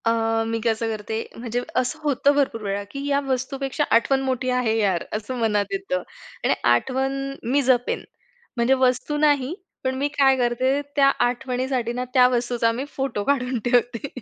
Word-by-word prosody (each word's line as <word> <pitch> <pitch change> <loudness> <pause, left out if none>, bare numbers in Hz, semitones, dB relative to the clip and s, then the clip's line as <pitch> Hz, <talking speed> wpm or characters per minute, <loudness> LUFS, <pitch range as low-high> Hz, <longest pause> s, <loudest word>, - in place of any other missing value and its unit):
अ, 225 0 +1
मी 225 0 -1
कसं 225 0 0
करते 220 0 -4 0.2
म्हणजे 240 +1 -3 0.2
असं 255 +5 -4
होतं 285 -1 +3
भरपूर 275 -5 0
वेळा, 200 0 -2
की 280 0 -5
"या 280 0 +2
वस्तूपेक्षा 270 +2 -1
आठवण 265 +4 +3
मोठी 260 -1 -1
आहे 250 -3 +1
यार!" 195 -6 +1
असं 215 +4 -3
मनात 210 -3 +1
येतं 385 -8 -2 0.4
आणि - - +3 0.2
आठवण 265 - +1 0.4
मी 285 +2 +4
जपेन 250 -2 +1 0.5
म्हणजे 235 +3 +3
वस्तू 255 +4 0
नाही 290 -1 +2 0.3
पण 260 0 0
मी 275 +2 0
काय 270 -1 +5
करते 255 +3 +1
त्या 280 -1 +5 0.2
आठवणीसाठी 250 -1 -2
ना 250 +1 -3
त्या 250 -1 +6
वस्तूचा 240 -1 +1
मी 250 +4 -4
फोटो 265 -6 -2
काढून 255 -1 0
ठेवते. 245 +1 +1
250 Hz, 165 wpm, -23 LUFS, 230-270 Hz, 0.5 s, त्या